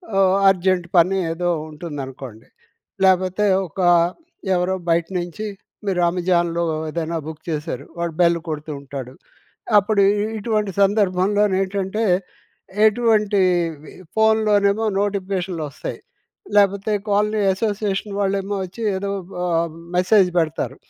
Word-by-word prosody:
ఆహ్, 190 Hz, -1 st, +4 dB
అర్జెంట్ 185 Hz, -1 st, +1 dB
పని 180 Hz, +3 st, +4 dB
ఏదో 175 Hz, +1 st, -1 dB, 0.2 s
ఉంటుందనుకోండి. 135 Hz, -7 st, -8 dB, 0.6 s
లేకపోతే 185 Hz, +2 st, +3 dB, 0.2 s
ఒక 165 Hz, -, -11 dB, 0.8 s
ఎవరో 180 Hz, +1 st, 0 dB
బయట 165 Hz, 0 st, +2 dB
నుంచి 175 Hz, +5 st, -5 dB, 0.4 s
మీరు 180 Hz, -2 st, +1 dB
అమెజాన్‍లో 170 Hz, -1 st, 0 dB, 0.3 s
ఏదైనా 165 Hz, +1 st, -3 dB
బుక్ 160 Hz, -1 st, -8 dB
చేశారు. 155 Hz, 0 st, -4 dB
వాడు 170 Hz, -1 st, -2 dB
బెల్ 170 Hz, 0 st, +4 dB
కొడుతూ 155 Hz, 0 st, -5 dB
ఉంటాడు. 135 Hz, -2 st, -7 dB, 0.7 s
అప్పుడు 205 Hz, 0 st, +1 dB, 0.4 s
ఇటువంటి 210 Hz, -2 st, -1 dB
సందర్భంలో 200 Hz, 0 st, +2 dB, 0.2 s
ఏంటంటే 195 Hz, +3 st, -2 dB, 0.8 s
ఎటువంటి 215 Hz, -2 st, +2 dB, 0.8 s
ఫోన్‌లోనేమో 220 Hz, -1 st, +3 dB, 0.2 s
నోటిఫికేషన్లు 190 Hz, -4 st, -2 dB
వస్తాయి. -, -, -6 dB, 0.6 s
లేకపోతే 200 Hz, +1 st, +3 dB, 0.2 s
కాలనీ 210 Hz, +1 st, +1 dB
అసోసియేషన్ 205 Hz, 0 st, -2 dB
వాళ్ళేమో 200 Hz, 0 st, -1 dB
వచ్చి 195 Hz, +6 st, -11 dB, 0.2 s
ఏదో 200 Hz, +1 st, -3 dB, 0.4 s
ఆహ్, 170 Hz, -2 st, 0 dB, 0.2 s
మెసేజ్ 185 Hz, +1 st, +4 dB
పెడతారు. 160 Hz, -1 st, -2 dB
190 Hz, 105 wpm, -21 LUFS, 170-205 Hz, 0.8 s, ఆహ్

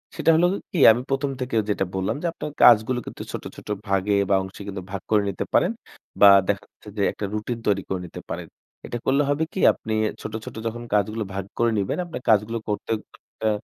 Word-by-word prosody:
সেটা -, -, +1 dB
হলো 170 Hz, +2 st, +4 dB, 0.2 s
কি? 175 Hz, -, -1 dB
আমি 120 Hz, +2 st, 0 dB
প্রথম 135 Hz, +1 st, 0 dB
থেকে 125 Hz, -2 st, -3 dB
যেটা 100 Hz, -2 st, +1 dB
বললাম 95 Hz, 0 st, -1 dB
যে -, -, -4 dB
আপনার 150 Hz, -, -6 dB
কাজগুলো 120 Hz, +2 st, +6 dB
কিন্তু -, -, -8 dB
ছোট, -, -, -5 dB
ছোট -, -, -13 dB, 0.2 s
ভাগে 100 Hz, +1 st, +1 dB
বা 100 Hz, -, +4 dB
অংশে 95 Hz, +1 st, -10 dB
কিন্তু 95 Hz, -1 st, -5 dB
ভাগ 100 Hz, -1 st, -4 dB
করে 105 Hz, -1 st, +4 dB
নিতে 95 Hz, -, -3 dB
পারেন। 180 Hz, -, +4 dB, 0.5 s
বা 100 Hz, -, +10 dB, 0.2 s
দেখা 100 Hz, 0 st, 0 dB
যাচ্ছে 105 Hz, -, -15 dB
যে -, -, 0 dB
একটা 105 Hz, -, -5 dB
রুটিন 110 Hz, +3 st, -3 dB
তৈরি 100 Hz, -1 st, +2 dB
করে 95 Hz, -, -1 dB
নিতে 85 Hz, -, -9 dB
পারেন। -, -, -5 dB, 0.4 s
এটা 120 Hz, -, -4 dB
করলে 140 Hz, +2 st, +3 dB
হবে 145 Hz, +2 st, +1 dB
কি -, -, -4 dB
আপনি 110 Hz, -, -5 dB, 0.3 s
ছোট, -, -, -6 dB
ছোট -, -, -8 dB, 0.4 s
কাজগুলো 105 Hz, +2 st, 0 dB
ভাগ 95 Hz, -1 st, -3 dB
করে 115 Hz, 0 st, +2 dB
নিবেন, 100 Hz, -1 st, -1 dB
আপনার 165 Hz, -6 st, -7 dB
কাজগুলো 110 Hz, +1 st, +3 dB
করতে 105 Hz, +2 st, -3 dB, 0.2 s
খুব -, -, -20 dB
একটা 110 Hz, -, -1 dB
105 Hz, 210 wpm, -24 LUFS, 100-125 Hz, 0.5 s, বা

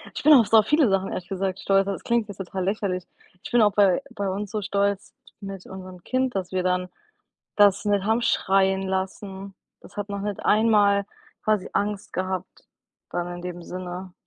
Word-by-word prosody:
Ich -, -, -4 dB
bin 305 Hz, +2 st, +7 dB
auf 240 Hz, -7 st, +7 dB
so 220 Hz, -1 st, +7 dB
viele 295 Hz, +3 st, +3 dB
Sachen 195 Hz, 0 st, +1 dB
ehrlich 175 Hz, -, -5 dB
gesagt 195 Hz, -1 st, -2 dB
stolz, 195 Hz, 0 st, +3 dB
also 195 Hz, 0 st, -1 dB
das 190 Hz, -, -7 dB
klingt 235 Hz, -2 st, +1 dB
jetzt 205 Hz, -, -9 dB
total 190 Hz, 0 st, -4 dB
lächerlich. 190 Hz, -2 st, -1 dB, 0.4 s
Ich -, -, -7 dB
bin 240 Hz, -1 st, +5 dB
auch 205 Hz, -1 st, +4 dB
bei 200 Hz, +3 st, +3 dB
bei 200 Hz, -3 st, -2 dB
uns 200 Hz, +1 st, -3 dB
so 215 Hz, -, -2 dB
stolz 200 Hz, 0 st, -1 dB, 0.3 s
mit 195 Hz, -2 st, -8 dB
unserem 185 Hz, -2 st, -10 dB
Kind, 255 Hz, +3 st, -1 dB
dass 190 Hz, -2 st, -3 dB
wir 185 Hz, -1 st, 0 dB
dann 180 Hz, 0 st, 0 dB, 0.7 s
das 205 Hz, -1 st, +5 dB
nicht 205 Hz, -2 st, +1 dB
haben 220 Hz, +3 st, +2 dB
schreien 190 Hz, -3 st, +2 dB
lassen. 190 Hz, +1 st, -4 dB, 0.3 s
Das 200 Hz, -, -16 dB
hat 205 Hz, 0 st, -4 dB
noch 200 Hz, 0 st, -4 dB
nicht 205 Hz, 0 st, -3 dB
einmal 205 Hz, -2 st, +4 dB, 0.4 s
quasi 215 Hz, -3 st, +1 dB
Angst 205 Hz, 0 st, -2 dB
gehabt 185 Hz, 0 st, -4 dB, 0.5 s
dann 175 Hz, 0 st, -3 dB
in 175 Hz, -, -9 dB
dem 175 Hz, -1 st, -6 dB
Sinne. 180 Hz, +1 st, -7 dB
195 Hz, 195 wpm, -24 LUFS, 185-205 Hz, 0.7 s, bin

